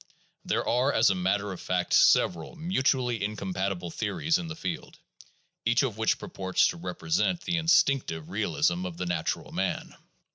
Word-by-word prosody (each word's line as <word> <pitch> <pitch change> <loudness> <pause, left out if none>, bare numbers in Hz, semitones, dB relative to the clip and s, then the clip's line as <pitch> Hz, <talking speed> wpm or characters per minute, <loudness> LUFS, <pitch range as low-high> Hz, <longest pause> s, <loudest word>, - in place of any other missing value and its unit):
There - - -1
are, 125 +4 +2
as 110 -6 +4
a - - +2
matter 95 +2 0
of 90 - -7
fact, 90 -1 -1
several 85 - +4
mutually 130 - 0
incompatible 95 -3 -3
theories 115 - 0
in 175 - -5
the 160 - -6
field, 165 +1 -5 0.7
each 120 +4 +3
of 125 -6 -1
which 110 0 +1
purports 95 -1 0
to 175 - -5
represent 175 +1 -1
the 175 -1 -1
instinc 155 -5 +3
tive 80 -1 -6
realism 90 -2 0
of 85 -2 -8
the 90 - -3
natural 85 -2 -2
man. - - -3
105 Hz, 160 wpm, -28 LUFS, -, 0.7 s, as